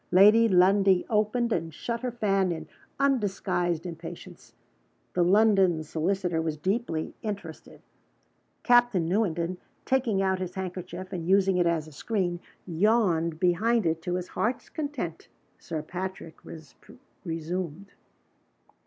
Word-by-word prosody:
Lad 195 +4 +8
y 230 0 +5
Lundie 190 -1 +4
opened 220 +2 +1
and 165 -1 -2
shut 235 +9 -4
her 255 - -1
fan 195 -5 +1
in 160 -2 -5 0.3
undisguised 195 - 0
impatience. 165 -1 -9 0.6
The 180 - +1
London 190 -3 +4
solicitor 170 +2 -1
was 160 -1 -2
deeply 185 -2 -2
interested. 200 -7 -7 0.8
Captain 240 -8 +4
Newenden, 175 -2 0 0.3
taking 250 -7 +1
out 190 -1 +1
his 185 -1 -5
handkerchief, 185 0 -6
and 170 -2 -4
using 190 0 +3
it 175 -1 +3
as 165 -2 0
a - - -12
screen, 175 +2 -2 0.3
yawned 175 -3 +1
behind 215 +6 +2
it 165 0 0
to 175 +2 -2
his 180 0 -4
heart's 235 +4 -2
content. 285 - -5 0.3
Sir 160 -3 -5
Patrick 180 -1 -6 0.9
resumed. 170 +2 -4
185 Hz, 125 wpm, -27 LUFS, 170-210 Hz, 0.9 s, Lad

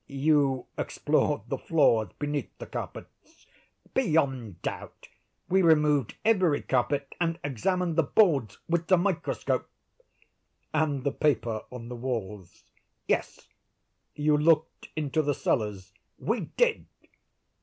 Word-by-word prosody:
"You 140 -2 +2
explored - - 0
the - - -3
floors 115 -9 +3
beneath 145 0 -2
the - - -7
carpets?" - - -9 0.5
"Beyond 135 - 0
doubt. - - -6 0.4
We 190 +1 +3
removed 150 - +3
every 185 -9 +3
carpet, 135 +2 0
and 165 -1 +1
examined 170 - -1
the - - +6
boards 145 - +2
with 170 0 0
the 185 - +5
microscope." 175 -1 -1 1.0
"And 150 -4 0
the 140 - +1
paper 120 -8 0
on 120 -2 -8
the 125 - -5
walls?" 105 -7 -5 0.4
"Yes." - - -1 0.7
"You 150 0 +2
looked 160 +1 +2
into 155 0 0
the 145 -2 0
cellars?" 100 -6 -2 0.2
"We - - -1
did." 485 -2 +2
145 Hz, 115 wpm, -28 LUFS, 125-165 Hz, 1.0 s, the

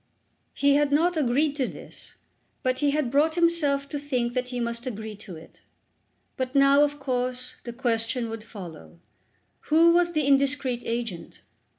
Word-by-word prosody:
He 280 0 +3
had 290 -1 +1
not 340 +5 +3
agreed 290 +1 +1
to 260 -3 0
this, - - -12 0.5
but 255 -1 0
he 290 - +2
had 280 -4 0
brought 305 +3 +2
himself 320 -5 +2
to 290 - -4
think 250 -4 -2
that 250 0 -1
he 250 -1 -4
must 235 +1 -3
agree 220 -2 -5
to 195 -4 -10
it. 160 +1 -14 0.8
But 260 +1 -3
now, 275 +1 +6
of 290 0 -1
course, 255 -1 -3
the 235 - -6
question 235 -1 -1
would 225 -1 -6
follow: 165 - -11 0.7
Who 330 +2 +6
was 345 0 +2
the 305 -3 +1
indiscreet 275 -2 +1
agent? 230 -7 -5
260 Hz, 165 wpm, -26 LUFS, 235-290 Hz, 0.8 s, now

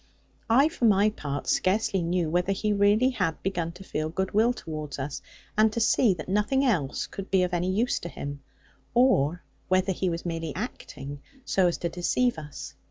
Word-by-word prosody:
I, 265 +6 +6
for 320 -7 -1
my 210 0 +4
part, 145 -8 -5
scarcely 195 0 +1
knew 170 0 0
whether 180 +4 +1
he 210 +2 0
really 205 +5 +4
had 180 -10 -1
begun 175 -3 -1
to 185 +2 -11
feel 155 -4 -3
goodwill 195 +7 +2
towards 155 - -6
us, 135 +1 -4 0.3
and 215 0 +4
to 235 - -1
see 225 -2 +3
that 155 - -8
nothing 210 +8 +1
else 155 - 0
could 195 0 -8
be 190 -1 +3
of 180 0 -2
any 175 +1 0
use 225 +6 +1
to 170 - -6
him; 140 -3 -6 0.5
or 180 - +3 0.2
whether 185 +1 +2
he 185 0 -1
was 170 0 -4
merely 165 -3 -3
acting, 145 - -6 0.2
so 190 -2 +3
as 175 - 0
to 170 - -2
deceive 210 +5 0
us. 150 -2 -8
185 Hz, 185 wpm, -27 LUFS, 165-215 Hz, 0.5 s, I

